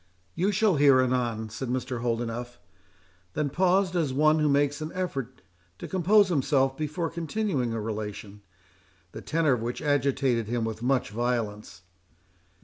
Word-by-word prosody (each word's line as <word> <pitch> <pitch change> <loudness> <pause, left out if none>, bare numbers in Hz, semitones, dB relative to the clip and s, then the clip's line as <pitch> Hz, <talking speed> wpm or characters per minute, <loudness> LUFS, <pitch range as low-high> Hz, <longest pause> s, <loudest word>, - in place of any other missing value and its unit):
"You 185 +5 +1
shall 200 -4 +2
hear 140 -2 +6
anon," 120 -4 0
said 125 +3 -5
Mr. 125 -1 -3
Holdenough; 120 0 -3 0.8
then 145 -2 -1
paused 185 +2 +2
as 160 -6 +1
one 155 +3 +3
who 150 -1 +2
makes 145 +1 +1
an 155 +1 -4
effort 135 -9 -4 0.3
to - - -7
compose 190 +2 +3
himself 135 -4 +1
before 155 +3 -3
continuing 170 - -2
a 115 - -2
relation, 105 -1 -6 0.7
the - - -8
tenor 155 -3 +1
of 120 - -2
which 120 +1 -3
agitated 135 -5 +1
him 120 0 -1
with 110 0 -5
much 125 -2 0
violence. 105 -6 -3
135 Hz, 145 wpm, -27 LUFS, 120-155 Hz, 0.8 s, hear